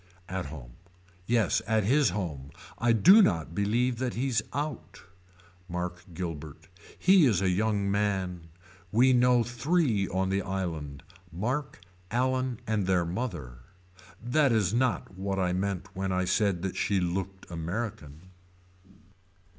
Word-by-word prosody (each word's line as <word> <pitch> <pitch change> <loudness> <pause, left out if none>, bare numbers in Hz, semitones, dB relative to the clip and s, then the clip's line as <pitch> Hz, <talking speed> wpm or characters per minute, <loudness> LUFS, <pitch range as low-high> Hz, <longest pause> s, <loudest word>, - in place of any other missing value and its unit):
At 95 -4 -4
home. 65 -5 -10 0.5
Yes 115 -2 +2
at 110 0 +2
his 135 +4 +3
home. 80 -8 -4 0.3
I 120 0 +3
do 185 - +7
not 80 - +1
believe 115 +6 0
that 125 -2 -2
he's 125 -1 0
out. 145 -8 -5 0.7
Mark 90 +1 -4
Guilbert. 80 -4 -6 0.3
He 185 -5 +5
is 105 -8 +2
a 95 -1 +1
young 100 0 0
man. 95 -4 -1 0.4
We 125 +4 +5
know 125 -1 +4
three 120 - +1
on 95 +1 -1
the 95 +1 +1
island. 80 -8 -4 0.3
Mark, 125 - -3 0.3
Allan 130 0 0
and 105 -4 -1
their 90 -2 +2
mother. 85 - -5 0.6
That 135 +4 +2
is 105 -4 +2
not 120 -5 0
what 95 0 -2
I 90 -2 +1
meant 95 0 -2
when 95 0 -2
I 90 0 0
said 95 -2 +1
that 95 - -3
she 100 -2 +1
looked 95 +2 -3
American. 85 -3 -5
100 Hz, 135 wpm, -28 LUFS, 90-120 Hz, 0.7 s, do